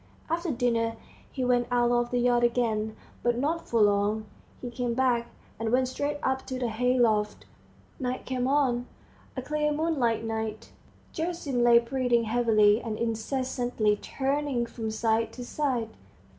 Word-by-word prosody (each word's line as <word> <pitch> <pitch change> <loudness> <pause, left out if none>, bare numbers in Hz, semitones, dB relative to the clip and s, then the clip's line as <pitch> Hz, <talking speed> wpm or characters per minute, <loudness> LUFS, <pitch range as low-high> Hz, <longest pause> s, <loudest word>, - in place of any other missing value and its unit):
After 340 +1 -1
dinner 230 -3 0 0.4
he 260 -2 -2
went 245 -1 +2
out 240 -1 +2
of 240 0 +1
the 245 - 0
yard 240 0 +3
again, 225 -3 +1 0.3
but 240 0 +1
not 310 +6 -1
for 230 - +2
long; 205 +1 +2 0.3
he 245 - -6
came 240 -1 -2
back, 245 -2 +2 0.3
and 225 -1 -1
went 255 +1 +3
straight 290 +3 -2
up 265 0 0
to 260 - -3
the 245 -2 -1
hay 250 +3 +1
loft. 215 -3 +1 0.5
Night 255 -1 -3
came 255 -1 -1
on, 260 -3 +1 0.5
a 260 - -3
clear 300 +2 0
moonlight 290 -8 0
night. 220 -1 -4 0.4
Gerasim 320 -7 -2
lay 240 0 +7
breathing 240 0 +1
heavily, 220 -2 +3
and 220 -2 -4
incessantly 235 -1 0
turning 270 +1 -1
from 225 -1 -5
side 225 0 0
to 245 - -7
side. 250 -5 -1
240 Hz, 155 wpm, -28 LUFS, 225-260 Hz, 0.5 s, lay